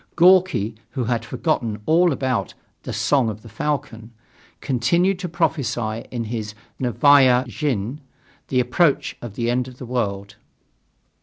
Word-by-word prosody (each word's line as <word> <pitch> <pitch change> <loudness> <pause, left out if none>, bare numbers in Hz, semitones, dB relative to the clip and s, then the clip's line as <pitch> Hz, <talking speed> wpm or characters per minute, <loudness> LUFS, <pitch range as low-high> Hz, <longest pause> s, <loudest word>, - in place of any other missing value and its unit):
Gorki, 175 - +4 0.2
who 130 - -1
had 120 0 -1
forgotten 120 -5 -2
all 170 +2 +4
about 130 -3 -2 0.3
"The - - -6
Song 135 -5 +1
of 110 +1 -7
the 115 - -12
Falcon," 115 -2 -4 0.5
continued 170 +9 +1
to 180 -2 -4
prophesy 125 -9 -1
in 120 -2 -3
his 110 -1 -5 0.2
Novaya 130 0 +5
Zhizn 135 -4 -3 0.5
the 130 - +1
approach 135 +5 +1
of 115 -4 -8
the 120 0 0
end 125 +1 0
of 125 -1 -12
the 130 - -8
world. 105 -4 -3
125 Hz, 140 wpm, -22 LUFS, 115-150 Hz, 0.5 s, Novaya